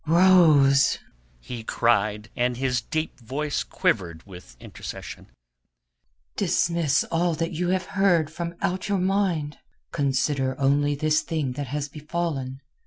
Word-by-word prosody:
"Rose," 155 -6 +5 0.4
he 115 - -7
cried, 110 -2 0
and 125 0 0
his 130 -2 0
deep 155 +3 -3
voice 140 +5 -2
quivered 85 -4 -1
with 90 -11 -13
intercession, - - -9 1.1
"dismiss 170 -3 +1
all 170 0 +1
that 165 +1 -2
you 175 +2 -2
have 185 0 0
heard 175 -7 +2
from 170 +1 -5
out 185 +2 -1
your 200 - +2
mind. 185 -6 0 0.3
Consider 135 -1 0
only 145 +1 +2
this 155 +2 +1
thing 155 -5 -2
that 140 +2 -5
has 145 +2 -3
befallen. 150 -3 -4
145 Hz, 125 wpm, -25 LUFS, 130-170 Hz, 1.1 s, Rose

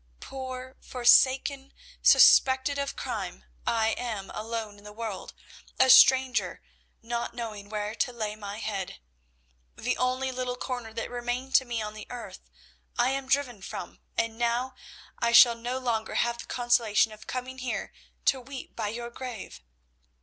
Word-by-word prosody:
Poor, 260 -1 -7
forsaken, 265 +2 +3 0.3
suspected 265 +2 +6
of 280 0 -3
crime, 60 +1 -5 0.2
I 225 -1 +2
am 215 -5 -4
alone 220 -2 -5
in - - -19
the 210 - -10
world, 215 -3 -6 0.4
a 260 - +7
stranger, 260 -1 +6 0.4
not 235 0 -3
knowing 215 -4 -6
where 210 0 -3
to 250 - -1
lay 215 -3 -4
my 205 -1 -7
head. 200 -4 -4 0.8
The - - -1
only 255 +1 0
little 250 -1 -3
corner 245 -3 -5
that 230 +1 -5
remained 245 +2 -3
to 260 - 0
me 235 -3 -3
on 210 0 -5
the 215 0 -10
earth 245 -1 -8 0.6
I 245 +2 +3
am 270 0 -3
driven 265 -6 0
from, - - -7 0.2
and 230 0 -1
now 240 +2 0 0.5
I 235 0 +1
shall 240 0 +9
no 240 +2 -4
longer 235 -4 -2
have 235 0 +1
the - - -7
consolation 235 -3 +2
of 215 0 -13
coming 255 +1 -5
here 250 -2 -4 0.3
to 265 - +3
weep 270 +1 -9
by 220 -2 -2
your 235 +3 -5
grave!" 235 - -8
240 Hz, 155 wpm, -28 LUFS, 220-255 Hz, 0.8 s, shall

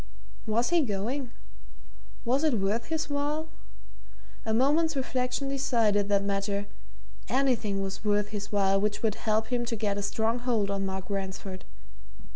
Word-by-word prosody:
Was 230 +7 +1
he 345 -1 +5
going? 245 +3 -2 1.0
was 260 +5 +2
it 305 -6 +3
worth 210 +3 0
his 320 -1 -2
while? 295 +2 -1 1.0
A - - +1
moment's 295 +7 +3
reflection 260 0 -1
decided 230 -7 +2
that 200 -1 +3
matter 200 0 -1 0.6
anything 235 -7 +1
was 195 +1 -5
worth 205 -1 +2
his 205 -1 -5
while 195 -1 +3
which 210 +1 -1
would 220 -2 +3
help 220 0 0
him 240 -1 +1
to 235 -1 -2
get 205 -2 -1
a - - -1
strong 225 +3 0
hold 230 -5 +1
on 195 -1 -1
Mark 190 -1 -4
Ransford. 190 -1 -4
220 Hz, 150 wpm, -29 LUFS, 200-260 Hz, 1.0 s, he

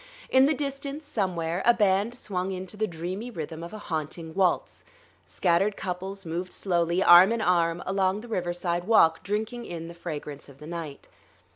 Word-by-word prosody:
In 260 +1 +6
the 310 - +2
distance, 280 +1 -4
somewhere, 180 - -1
a 240 - +5
band 205 +2 +2
swung 190 -5 -3
into 185 +1 -6
the 215 +1 0
dreamy 180 +7 -5
rhythm 160 -6 -6
of 170 - -7
a 215 - -7
haunting 160 -3 -5
waltz. 185 -1 0 0.4
Scattered 195 +3 +1
couples 190 +1 -4
moved 175 +3 -4
slowly, 175 -1 +1
arm 175 +4 +8
in 230 - 0
arm, 170 -4 +1
along 190 +1 0
the 240 - -11
riverside 175 -3 -2
walk, 165 -7 +5
drinking 220 +4 -3
in 165 -1 -6
the - - -8
fragrance 150 -4 -7
of 140 - -15
the 150 - -11
night. 160 -3 -7
185 Hz, 170 wpm, -27 LUFS, 170-210 Hz, 0.4 s, arm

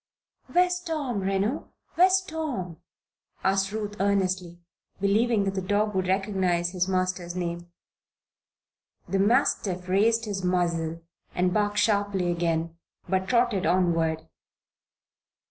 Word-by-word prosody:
"Where's 360 0 +2
Tom, 305 - -3
Reno? 195 +7 -1 0.2
Where's 370 +2 +5
Tom?" 285 - -4 0.7
asked 195 0 +1
Ruth, 210 -1 -4
earnestly, 185 -3 0 0.4
believing 210 +2 +2
that 195 -1 -1
the 190 - -2
dog 205 +3 0
would 185 -1 0
recognize 185 -3 0
his 180 -1 0
master's 185 -2 -1
name. 175 -1 -4 1.4
The 195 - 0
mastiff 195 -5 +1
raised 225 +5 +2
his 200 -3 -4
muzzle 170 -2 0 0.3
and 180 0 +1
barked 205 -1 0
sharply 200 -4 +1
again, 165 -1 -1 0.3
but 190 +1 0
trotted 235 -6 +2
onward. 165 -3 +1
195 Hz, 110 wpm, -26 LUFS, 180-210 Hz, 1.4 s, Where's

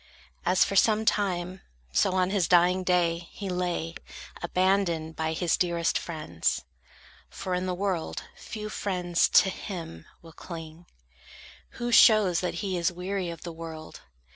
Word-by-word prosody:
As 180 +1 +5
for 195 - -2
some 215 +2 +4
time, 185 -3 0 0.3
so, 185 - +2
on 185 0 +1
his 195 -5 +1
dying 180 +1 +4
day, 175 -2 +1
He 200 -2 -6
lay, 175 -2 -2 0.5
abandoned 175 -3 +1
by 160 0 -1
his 170 +1 +1
dearest 170 -2 0
friends: 85 - -2 0.7
For 185 - -5
in 180 +1 -1
the 180 - -1
world, 185 -3 -2
few 215 -1 -7
friends 180 -5 0
to 190 - +5
him 165 - -7 0.2
will 165 -1 -13
cling, 165 0 -9 0.9
Who 240 0 -2
shows 210 -7 +6
that 180 -1 -2
he 190 -2 -1
is 170 +1 +1
weary 180 +1 -3
of 170 -2 -8
the 170 - -6
world. 160 -1 -9
180 Hz, 145 wpm, -27 LUFS, 165-190 Hz, 0.9 s, shows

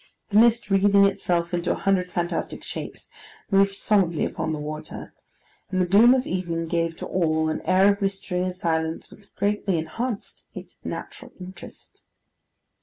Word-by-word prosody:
The 205 - +5
mist, 230 -2 +3
wreathing 200 0 +5
itself 175 -3 0
into 175 0 0
a - - -4
hundred 185 -2 0
fantastic 175 0 -3
shapes, - - -7 0.4
moved 195 0 +4
solemnly 190 -6 +1
upon 160 - -3
the 155 - -2
water; 155 +1 -7 0.6
and 185 - -1
the 180 - +3
gloom 220 +8 +6
of 260 0 0
evening 170 -3 -2
gave 165 0 -1
to - - -6
all 160 -3 0
an 155 - -2
air 190 +3 +5
of 200 - -11
mystery 195 -2 -2
and 185 0 -2
silence 160 -3 -2
which 205 -1 -17
greatly 200 -2 0
enhanced 205 +8 -5
its - - -11
natural - - -7
interest. 185 +1 -12
185 Hz, 160 wpm, -24 LUFS, 170-200 Hz, 0.6 s, gloom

